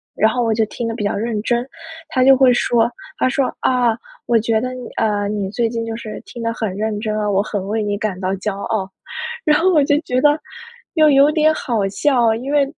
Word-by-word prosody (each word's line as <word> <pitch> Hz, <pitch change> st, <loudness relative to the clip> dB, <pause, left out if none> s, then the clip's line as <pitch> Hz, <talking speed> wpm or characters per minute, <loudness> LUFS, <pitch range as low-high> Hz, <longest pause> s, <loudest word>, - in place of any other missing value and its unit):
然 220 Hz, -, +3 dB
后 245 Hz, -1 st, 0 dB
我 225 Hz, -1 st, +1 dB
就 220 Hz, 0 st, +1 dB
听 230 Hz, +2 st, -5 dB
得 225 Hz, -, -3 dB
比 210 Hz, -, -4 dB
较 205 Hz, -, 0 dB
认 220 Hz, 0 st, -2 dB
真， 240 Hz, +1 st, 0 dB, 0.4 s
他 255 Hz, -4 st, +2 dB
就 270 Hz, 0 st, +7 dB
会 255 Hz, -1 st, +5 dB
说 235 Hz, -1 st, +2 dB, 0.3 s
他 255 Hz, -, +2 dB
说： 270 Hz, 0 st, +1 dB, 0.2 s
“啊 245 Hz, -3 st, +2 dB, 0.3 s
我 235 Hz, -, +3 dB
觉 220 Hz, 0 st, +1 dB
得 255 Hz, 0 st, -3 dB
你 250 Hz, -2 st, -8 dB
呃 205 Hz, -2 st, 0 dB
你 205 Hz, -2 st, -2 dB
最 230 Hz, +1 st, 0 dB
近 230 Hz, -1 st, -3 dB
就 225 Hz, 0 st, -4 dB
是 225 Hz, -1 st, -7 dB
听 235 Hz, -1 st, -8 dB
得 230 Hz, -, 0 dB
很 215 Hz, -5 st, -3 dB
认 215 Hz, 0 st, -2 dB
真 215 Hz, -1 st, -2 dB
啊， 210 Hz, -1 st, -1 dB
我 195 Hz, 0 st, +2 dB
很 205 Hz, -3 st, -4 dB
为 220 Hz, +1 st, -1 dB
你 205 Hz, 0 st, -1 dB
感 200 Hz, -3 st, -3 dB
到 190 Hz, 0 st, -1 dB
骄 195 Hz, +1 st, -3 dB
傲。 200 Hz, -1 st, -2 dB, 0.6 s
“然 300 Hz, -1 st, +4 dB
后 370 Hz, +3 st, +3 dB
我 300 Hz, -, +5 dB
就 290 Hz, +1 st, +3 dB
觉 255 Hz, -5 st, -1 dB
得 295 Hz, +1 st, +4 dB, 0.6 s
又 310 Hz, -1 st, +5 dB
有 280 Hz, +2 st, +5 dB
点 310 Hz, 0 st, +3 dB
好 220 Hz, -6 st, -1 dB
笑， 235 Hz, 0 st, +2 dB
因 255 Hz, +5 st, -5 dB
为 290 Hz, -1 st, +3 dB
230 Hz, 255 characters per minute, -19 LUFS, 210-255 Hz, 0.6 s, 就